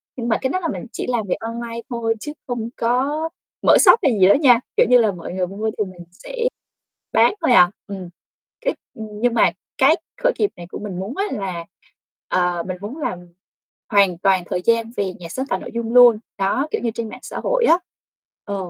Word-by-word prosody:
nhưng 240 -2 -4
mà 225 - +2
cái 260 - 0
đó 370 - -1
là 345 - -2
mình 285 - -4
chỉ - - -4
làm 230 -4 -1
việc 180 - 0
online 230 0 -5
thôi 230 -2 -1
chứ 295 +4 -6
không 235 -2 -3
có 275 +7 0 0.4
mở - - +8
shop - - +7
hay 275 - +4
gì 185 - +7
đó 200 - +7
nha, 260 -5 +5 0.2
kiểu - - +6
như 250 - +7
là, 225 -4 +3
mọi 175 -1 -8
người 185 -1 -1
mua 210 +4 -3
thì 210 - +1
mình 185 -2 -10
sẽ - - -10 0.8
bán - - +5
thôi 320 - +2
à. 180 -5 +7 0.2
Ừm, 190 -3 -7 0.5
cái - - 0 0.2
nhưng 220 +2 -2
mà 235 - +4 0.3
cái 275 +4 +5 0.3
khởi - - +5
nghiệp 415 - +3
này 175 - -8
của - - -6
mình 195 -4 -6
muốn 210 - -5
á 395 - +1
là, 185 -5 -4 0.6
ờ, 180 -1 0
mình 185 - -4
muốn 220 +9 -6
làm 185 - -3 0.7
hoàn 200 -5 +3
toàn 190 -2 +2
thời 180 - -1
gian 230 0 +2
về 190 -2 -1
nhà 175 - -10
sáng 260 +9 -4
tạo - - -1
nội - - -8
dung 235 0 -3
luôn, 245 -3 +8 0.2
đó, 200 +9 0
kiểu - - -1
như, 230 -2 -1
trên 230 -2 -4
mạng 250 - -10
xã - - -6
hội - - +2
á. 335 - +6 0.7
Ờ, 200 - -4
225 Hz, 220 wpm, -21 LUFS, 195-250 Hz, 0.8 s, mở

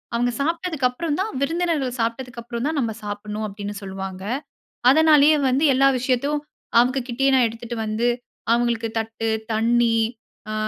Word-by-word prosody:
அவங்க 245 +1 +1
சாப்பிட்டதுக்கு 325 -3 0
அப்புறம் 295 +4 -3
தான் 435 - -2
விருந்தினர்கள் 305 -4 0
சாப்பிட்டதுக்கு 235 +1 -3
அப்புறம் 235 +1 -4
தான் 310 -2 -1
நம்ம 230 -4 -1
சாப்பிடனும் 210 +1 -4
அப்படின்னு 205 0 -6
சொல்லுவாங்க. 190 -1 -6 0.7
அதனாலேயே 305 0 +6
வந்து 270 +5 +1
எல்லா 270 +1 +4
விஷயத்தையும் 280 +4 0 0.4
அவங்க 255 +3 +3
கிட்டயே 270 +3 +2
நான் 250 -3 +4
எடுத்துட்டு 230 +1 -7
வந்து 215 +3 0 0.5
அவங்களுக்கு 235 -1 +1
தட்டு, 225 0 -3 0.2
தண்ணீ 230 +1 +3 0.6
அ - - -3
240 Hz, 140 wpm, -22 LUFS, 225-280 Hz, 0.7 s, அதனாலேயே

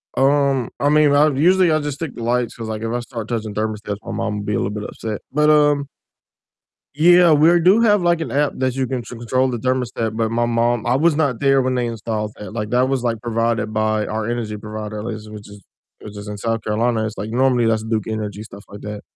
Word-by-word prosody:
Um, 135 -2 +2
I 145 - +2
mean, 150 -1 +4
I 150 +2 +5
usually 175 +5 +3
I 155 - +2
just 145 -2 -4
stick 160 -5 -5
to 115 - -6
lights 120 0 0
'cause, 115 -1 -6
like, 110 0 -5
if 115 - -2
I 120 - -1
start 115 -3 -7
touching 110 -3 -3
thermostats, 105 -1 -3
my 115 - -7
mom 105 -1 -2
will 105 - -6
be 105 - -2
a - - +1
little 95 - -1
bit 105 0 -5
upset, 110 -1 -6
but, 150 +2 +3
um 145 -2 +3 1.1
Yeah, 175 +2 +6
we're 160 +4 +5
do 190 +7 +5
have 205 -5 +3
like 170 -1 +2
an 125 - -4
app 145 +1 +1
that 130 -1 -1
you 135 -1 0
can 125 -1 -3
ch - - -13
control 125 +2 -1
the 120 - -2
thermostat, 120 -3 -2
but 110 -1 0
my 120 +1 0
mom 120 -1 0
I 120 +2 +2
was 160 +2 +3
not 140 -7 0
there 135 -1 +3
when 130 0 0
they 125 -1 0
installed 110 -2 -4
that, 105 +1 -9
like, 105 -2 -3
that 125 +1 +2
was, 135 -2 -1
like, 115 -2 -1
provided 115 -2 -1
by 110 0 0
our 110 +1 -3
energy 110 -3 -3
provider, 105 0 -6
at 105 - -6
least 110 -2 -6
which 105 -1 -10
is 100 -2 -14 0.4
which 105 -1 -10
is 105 0 -8
in 105 0 -6
South 115 +1 -2
Carolina, 110 +1 0
it's 110 -1 -6
like 105 +3 -5
normally 125 -1 +2
that's 110 -1 +1
Duke 110 -2 -1
Energy, 105 -1 -4
stuff 100 -1 -12
like 100 0 -10
that, 105 0 -6
115 Hz, 245 wpm, -20 LUFS, 110-135 Hz, 1.1 s, Yeah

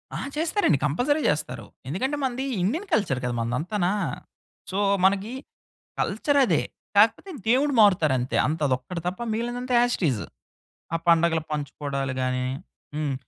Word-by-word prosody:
ఆ! - - -3 0.2
చేస్తారండి, 325 - +2
కంపల్సరీ 260 - +1
చేస్తారు. 125 -6 -2 0.2
ఎందుకంటే 260 - -1
మనది 260 +1 -1 0.2
ఇండియన్ 320 - -1
కల్చర్ 150 - +2
కదా 125 - -1
మనదంతానా! 175 - -1 0.8
సో, 190 - -2 0.3
మనకీ 200 +4 +2 0.7
కల్చరదే, 270 +5 +2 0.3
కాకపోతే 225 - +4 0.2
దేవుడు 275 +4 +3
మారుతారంతే. 155 - +3
అంతదొక్కటి 145 +1 -1
తప్ప 180 +4 -3
మిగిలినదంతా 240 +3 -2
యాజ్ 245 0 +1
టీజు. 130 - 0 0.7
ఆ - - +2
పండుగలు 165 -1 +4
పంచుకోవడాలు 140 -2 -3
గానీ 130 0 0 0.5
హ్మ్. 150 -2 -1
180 Hz, 115 wpm, -25 LUFS, -, 0.8 s, కాకపోతే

